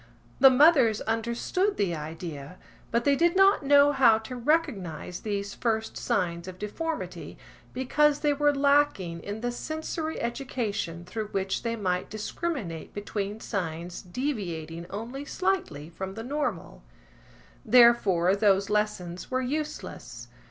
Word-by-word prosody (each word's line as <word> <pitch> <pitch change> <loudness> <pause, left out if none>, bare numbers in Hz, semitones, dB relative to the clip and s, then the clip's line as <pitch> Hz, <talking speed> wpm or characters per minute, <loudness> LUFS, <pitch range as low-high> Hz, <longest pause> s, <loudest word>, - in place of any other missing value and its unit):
The 270 0 +9
mothers 260 -5 +5
understood 235 - -1
the 195 -4 0
idea, 155 0 -7 0.3
but 235 +1 +1
they 280 +2 +4
did 340 +4 +2
not 390 -2 +5
know 285 +1 +6
how 255 -6 +5
to 225 +3 -7
recognise 230 - -1
these 200 -1 -3
first 220 -1 -1
signs 170 -2 -1
of 185 -1 -8
deformity, 310 - -5 0.3
because 295 +3 +2
they 295 -1 +3
were 290 +1 +3
lacking 280 -12 +2
in 205 +5 -6
the 245 0 -1
sensory 315 +4 -4
education 220 -8 -3
through 215 +3 -4
which 195 -1 -2
they 230 -1 -2
might 185 -4 -2
discriminate 215 - -4
between 205 0 -4
signs 175 -3 -4
deviating 175 - -4
only 235 +7 -6
slightly 285 - -2
from 190 +2 -6
the 225 - -6
normal. 290 +4 -3 0.8
Therefore 215 -7 +5
those 200 -1 +2
lessons 185 -5 -2
were 255 0 0
useless. 250 - -5
220 Hz, 130 wpm, -27 LUFS, 185-280 Hz, 0.8 s, The